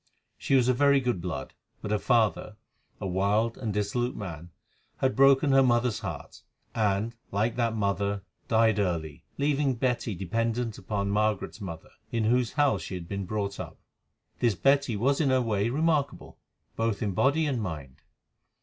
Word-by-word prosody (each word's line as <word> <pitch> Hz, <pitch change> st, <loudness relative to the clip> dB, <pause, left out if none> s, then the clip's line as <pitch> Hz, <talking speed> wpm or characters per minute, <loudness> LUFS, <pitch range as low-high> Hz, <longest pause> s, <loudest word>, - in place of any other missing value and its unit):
She 135 Hz, -, 0 dB
was 125 Hz, -2 st, +4 dB
of 130 Hz, -1 st, +2 dB
very 140 Hz, 0 st, +5 dB
good 125 Hz, -8 st, -1 dB
blood, 90 Hz, -1 st, -5 dB, 0.3 s
but 105 Hz, -, -5 dB
her 105 Hz, -, +2 dB
father, 110 Hz, -3 st, +1 dB, 0.4 s
a -, -, -5 dB
wild 100 Hz, +5 st, +1 dB
and 110 Hz, -4 st, -4 dB
dissolute 105 Hz, +5 st, -1 dB
man, 85 Hz, -4 st, -7 dB, 0.5 s
had 130 Hz, 0 st, 0 dB
broken 135 Hz, +1 st, +5 dB
her 135 Hz, 0 st, +6 dB
mother's 120 Hz, -3 st, +2 dB
heart, -, -, -7 dB, 0.3 s
and, 105 Hz, +1 st, 0 dB, 0.2 s
like 110 Hz, +4 st, 0 dB
that 115 Hz, -2 st, +1 dB
mother, 100 Hz, -1 st, -1 dB, 0.2 s
died 110 Hz, -2 st, +3 dB
early, 85 Hz, -6 st, -2 dB
leaving 140 Hz, -2 st, +1 dB
Betty 120 Hz, -3 st, -1 dB
dependent 115 Hz, +5 st, -2 dB
upon 100 Hz, 0 st, -2 dB
Margaret's 105 Hz, +1 st, 0 dB
mother, 85 Hz, -5 st, -7 dB, 0.2 s
in 115 Hz, -1 st, 0 dB
whose 120 Hz, +1 st, +2 dB
house 145 Hz, 0 st, +2 dB
she 95 Hz, -, -6 dB
had 85 Hz, -2 st, -7 dB
been 100 Hz, 0 st, -4 dB
brought 100 Hz, -1 st, -3 dB
up. -, -, -7 dB, 0.6 s
This 115 Hz, -4 st, +2 dB
Betty 135 Hz, +2 st, +2 dB
was 135 Hz, +7 st, +2 dB
in 140 Hz, -, +2 dB
her 130 Hz, 0 st, +3 dB
way 110 Hz, -3 st, 0 dB
remarkable, 150 Hz, +1 st, -1 dB, 0.4 s
both 115 Hz, 0 st, -1 dB
in 105 Hz, -, 0 dB
body 140 Hz, -, +2 dB
and 135 Hz, -6 st, -1 dB
mind. 70 Hz, -8 st, -6 dB
115 Hz, 165 wpm, -28 LUFS, 100-130 Hz, 0.6 s, her